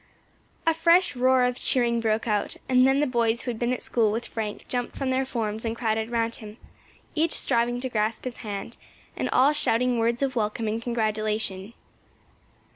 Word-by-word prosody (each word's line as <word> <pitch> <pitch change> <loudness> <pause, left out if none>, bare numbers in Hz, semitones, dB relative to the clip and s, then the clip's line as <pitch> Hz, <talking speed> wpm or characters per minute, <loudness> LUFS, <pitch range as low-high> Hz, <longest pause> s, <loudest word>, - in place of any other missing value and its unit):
A 325 - +4
fresh 335 0 +3
roar 255 0 +4
of 250 0 0
cheering 235 -2 +2
broke 225 +1 0
out, 210 -2 -1
and 255 0 +5
then 270 +2 +3
the - - +3
boys 235 -3 +1
who 245 - -2
had 225 - -7
been 240 0 0
at 255 - -2
school 225 -3 +2
with 230 +3 -3
Frank 215 -2 -5
jumped 245 -1 -2
from 270 -1 -2
their 260 0 0
forms 220 -4 -3
and 225 -1 -2
crowded 220 -1 -1
round 230 -1 -1
him, 215 0 -11 0.6
each 320 +1 +1
striving 240 -1 +1
to 260 - -2
grasp 220 -2 -1
his 255 -2 -5
hand, 205 +2 -6 0.4
and - - -2
all 275 +4 +4
shouting 250 -3 +1
words 235 +3 +1
of 270 -1 -1
welcome 220 0 -1
and 220 +2 -2
congratulation. 215 -3 -2
235 Hz, 190 wpm, -26 LUFS, 220-255 Hz, 0.6 s, and